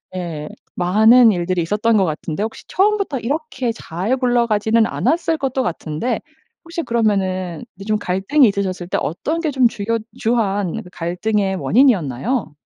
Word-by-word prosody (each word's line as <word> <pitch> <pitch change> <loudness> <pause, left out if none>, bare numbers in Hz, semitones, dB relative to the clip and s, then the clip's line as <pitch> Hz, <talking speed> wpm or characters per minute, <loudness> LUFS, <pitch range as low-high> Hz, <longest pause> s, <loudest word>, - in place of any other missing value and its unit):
예 165 -5 -5 0.3
많은 220 +6 +6
일들이 175 -1 -1
있었던 210 +6 +1
것 195 - +3
같은데 160 +3 -3
혹시 220 - -6
처음부터 400 -6 +1
이렇게 265 -1 -2
잘 200 +1 -2
굴러가지는 230 -3 +2
않았을 330 +6 0
것도 265 -1 -1
같은데 165 +3 -2 0.4
혹시 335 0 -5
그러면은 190 - -1
이제 195 - -10
좀 215 0 +1
갈등이 200 +10 +3
있으셨을 190 -3 -2
때 - - -1
어떤 300 - -2
게 330 -2 -1
좀 260 -3 +4
주요 230 0 -2 0.2
주한 205 -6 0
그 180 - -13
갈등의 190 +4 -1
원인이었나요? 190 - +1
215 Hz, 335 characters per minute, -19 LUFS, 180-250 Hz, 0.4 s, 많은